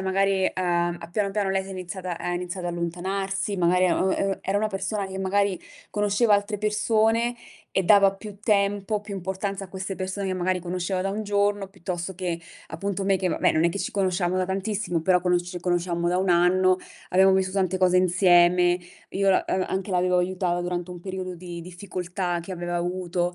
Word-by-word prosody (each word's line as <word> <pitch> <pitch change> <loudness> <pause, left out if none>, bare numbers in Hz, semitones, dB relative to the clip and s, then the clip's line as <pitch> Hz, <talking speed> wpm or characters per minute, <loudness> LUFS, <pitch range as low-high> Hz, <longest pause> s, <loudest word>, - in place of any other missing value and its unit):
magari, 190 0 +1
uhm, 175 -1 0
a 170 - -8
piano 200 +1 0
piano 200 -1 0
lei 190 0 +1
si 195 - -11
è - - -8
iniziata 185 -1 -5
ha 175 - -3
iniziato 175 0 -3
ad - - -3
allontanarsi, 195 +4 -2
magari 180 +1 +3
e 175 - +3
uhm, 190 - +1
ehm, 195 -1 0
era 195 - -1
una 215 +1 0
persona 195 +1 -2
che 190 0 -6
magari 195 0 +1 0.3
conosceva 210 +1 +3
altre 205 +1 0
persone 220 +3 +2 0.4
e 190 - +4
dava 195 +1 +5
più 205 0 -10
tempo, 205 0 +1
più 205 -1 -7
importanza 195 +2 -3
a - - -12
queste 190 +1 -5
persone 190 +1 -3
che - - -1
magari 185 0 0
conosceva 180 +1 -2
da 195 - -1
1 215 +2 -3
giorno, 205 0 +1
piuttosto 185 -1 -5
che 175 -2 -3 0.3
appunto 195 +4 -3
me 195 0 +3
che, 185 0 -2
vabbè - - +2
non 155 - +2
è - - +5
che 195 +4 -3
ci - - -2
conoscevamo 185 -2 0
da 185 - +1
tantissimo, 195 -1 -2
però 180 +1 +4
conosce 175 -1 +1
ci 180 0 -5
conosciamo 175 -1 -1
da 175 +1 +2
1 190 0 0
anno, 180 +1 +4 0.3
abbiamo 190 +1 +5
visto 190 0 +2
tante 190 -1 0
cose 185 -1 +3
insieme, 180 -1 +4 0.3
io 195 0 0
la 190 - +3
uhm, 185 0 +1
anche 190 +2 -3
l'avevo 180 0 +2
aiuta 180 -1 0
durante 175 0 -3
un 175 - -9
periodo 185 0 -5
di 175 -1 -8
difficoltà 180 0 -4
che 175 +3 -7
aveva 175 -1 -3
avuto. 175 0 -1
185 Hz, 205 wpm, -25 LUFS, 180-195 Hz, 0.4 s, dava